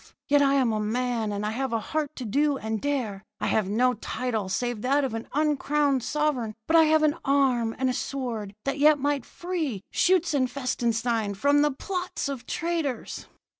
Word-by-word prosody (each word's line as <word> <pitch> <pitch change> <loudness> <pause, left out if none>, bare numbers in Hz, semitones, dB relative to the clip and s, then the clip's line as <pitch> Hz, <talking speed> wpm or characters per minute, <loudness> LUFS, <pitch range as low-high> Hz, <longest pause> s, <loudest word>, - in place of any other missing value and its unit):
Yet 290 0 +4
I 275 0 +4
am 255 -5 +2
a 215 - 0
man, 230 0 -1
and 205 0 -3
I 210 - -1
have 260 +3 -2
a 230 - +1
heart 305 +5 -3
to 255 - -6
do 285 +6 +1
and 220 -3 -3
dare. 240 -9 -2 0.2
I - - -2
have 210 -1 +1
no 250 +4 +3
title 220 -2 -3
save 240 +3 -2
that 275 +4 +2
of 260 -4 -2
an 225 0 -5
uncrowned 295 -2 +1
sovereign; 260 -6 -1
but 320 - +1
I 325 -1 +7
have 310 0 +3
an 305 +1 +2
arm 255 -5 +2
and 260 - 0
a 255 - +1
sword 235 -8 -4
that 275 +1 -1
yet 300 +1 +6
might 285 -2 -1
free 320 - -3
Schutzenfestenstein 250 - +1
from 285 +8 +3
the 295 - +4
plots 360 +4 -4
of 270 -4 -6
traitors.' 320 -7 -3
260 Hz, 185 wpm, -26 LUFS, 225-290 Hz, 0.2 s, I